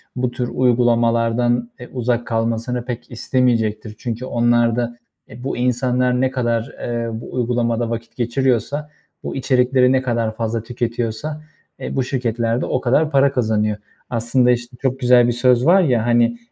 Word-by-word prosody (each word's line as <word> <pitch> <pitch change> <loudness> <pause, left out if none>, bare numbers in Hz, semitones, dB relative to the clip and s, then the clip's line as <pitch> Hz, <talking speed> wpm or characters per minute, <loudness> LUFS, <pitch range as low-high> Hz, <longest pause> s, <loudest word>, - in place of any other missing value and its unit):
bu 125 -1 -1
tür 125 0 -3
uygulamalardan, 120 -1 +2
eee, 125 - -10
uzak 120 -1 -1
kalmasını 115 +2 -1
pek 120 -1 -6
istemeyecektir. 115 -3 0
Çünkü 120 +1 -4
onlar 120 -1 +2
da, 120 0 -2 0.3
e, 120 +3 -11
bu 135 - -3
insanlar 125 0 +1
ne 130 - +1
kadar, 120 -3 -1
eee, 115 -1 -3
bu - - -10
uygulamada 120 -1 0
vakit 115 0 -6
geçiriyorsa, 130 +4 0 0.3
bu - - -5
içerikleri 130 -1 +3
ne 130 0 +3
kadar 115 -3 -1
fazla 115 -1 -2
tüketiyorsa, 120 +5 -3 0.4
eee, - - -5
bu 135 - +1
şirketler 120 -2 -1
de - - -1
o 130 - -1
kadar 150 +6 +2
para 140 0 +4
kazanıyor. 110 -4 0 0.3
Aslında 120 +1 +2
işte 120 +1 -3
çok 130 0 -1
güzel 125 -1 +5
bir - - +2
söz 125 +1 +3
var 185 +4 +6
ya, 125 -9 +1
hani, 120 0 +2
120 Hz, 160 wpm, -20 LUFS, 115-125 Hz, 0.4 s, var